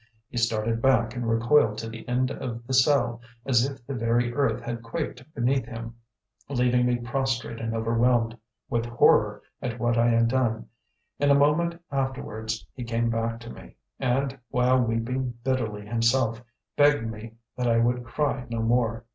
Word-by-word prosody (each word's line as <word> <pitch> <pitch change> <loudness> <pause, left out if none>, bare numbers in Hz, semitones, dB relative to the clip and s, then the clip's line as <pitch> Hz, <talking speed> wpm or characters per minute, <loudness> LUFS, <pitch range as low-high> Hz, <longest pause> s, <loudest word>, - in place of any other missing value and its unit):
He - - -7
started 115 -1 0
back 120 -3 +3
and 120 -2 -2
recoiled 115 -1 +3
to 115 0 -4
the 115 0 -9
end 125 +1 +1
of 120 -2 -5
the 130 - -4
cell, 125 -3 +3 0.2
as 120 -3 +3
if 135 -3 -11
the 140 - -5
very 120 0 +1
earth 140 +1 +1
had 120 -1 -5
quaked 115 +2 -5
beneath 130 0 +1
him, 115 0 -7 0.6
leaving 125 -2 +2
me 125 - +2
prostrate 120 -1 -2
and 115 0 -2
overwhelmed 115 +1 +2 0.3
with 120 0 -1
horror 120 0 +3 0.2
at 120 -1 -3
what 120 0 +1
I 120 - +4
had 115 0 +4
done. 115 -3 0 0.5
In 145 - +3
a 140 - +6
moment 160 +4 +2
afterwards 110 -7 -3
he 125 - -6
came 115 0 0
back 115 0 -1
to 115 - -9
me, - - -13 0.2
and, 135 +1 0
while 125 +1 +3
weeping 120 +2 -1
bitterly 115 -6 -1
himself, 115 +1 +1 0.3
begged 145 -4 +4
me 110 0 -8 0.2
that 125 -1 -1
I 115 -1 +3
would 120 +1 +1
cry 125 +1 -2
no 115 -1 -2
more. 115 0 +1
120 Hz, 170 wpm, -26 LUFS, 115-130 Hz, 0.6 s, a